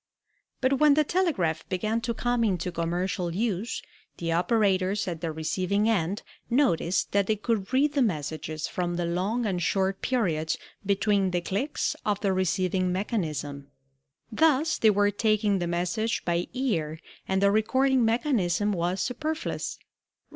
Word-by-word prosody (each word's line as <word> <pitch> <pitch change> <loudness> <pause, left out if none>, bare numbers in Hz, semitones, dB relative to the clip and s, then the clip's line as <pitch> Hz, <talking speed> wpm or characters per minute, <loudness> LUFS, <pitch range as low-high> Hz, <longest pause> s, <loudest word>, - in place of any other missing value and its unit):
But 265 +1 +2
when 300 -2 +6
the 305 - +4
telegraph 280 - 0
began 215 +5 -1
to 235 0 -2
come 245 0 0
into 180 -4 0
commercial 175 +1 -2
use 220 +1 -2 0.3
the 165 -1 -2
operators 195 +1 +1
at 170 -3 -4
the 165 -2 -2
receiving 185 +6 0
end 200 -3 0 0.3
noticed 235 - +2
that 200 -1 +2
they 220 - +2
could 210 -1 -2
read 280 +3 +3
the 285 - +2
messages 155 - -2
from 175 -1 -2
the 175 0 -1
long 190 +8 -1
and 185 -4 -1
short 190 +2 0
periods 170 -11 0 0.3
between 200 0 +2
the 180 -1 0
clicks 205 - -1
of 205 -1 0
the 195 -2 +1
receiving 185 0 +1
mechanism. 155 - -3 0.6
Thus 315 +5 +2
they 220 - +5
were 205 0 +3
taking 210 -1 +1
the 175 - -1
message 180 +7 -1
by 175 0 0
ear 165 - -1 0.3
and 190 0 +1
the 200 0 +4
recording 260 +5 +2
mechanism 225 - +1
was 180 0 -1
superfluous. 310 +6 -3
200 Hz, 145 wpm, -27 LUFS, 175-230 Hz, 0.6 s, when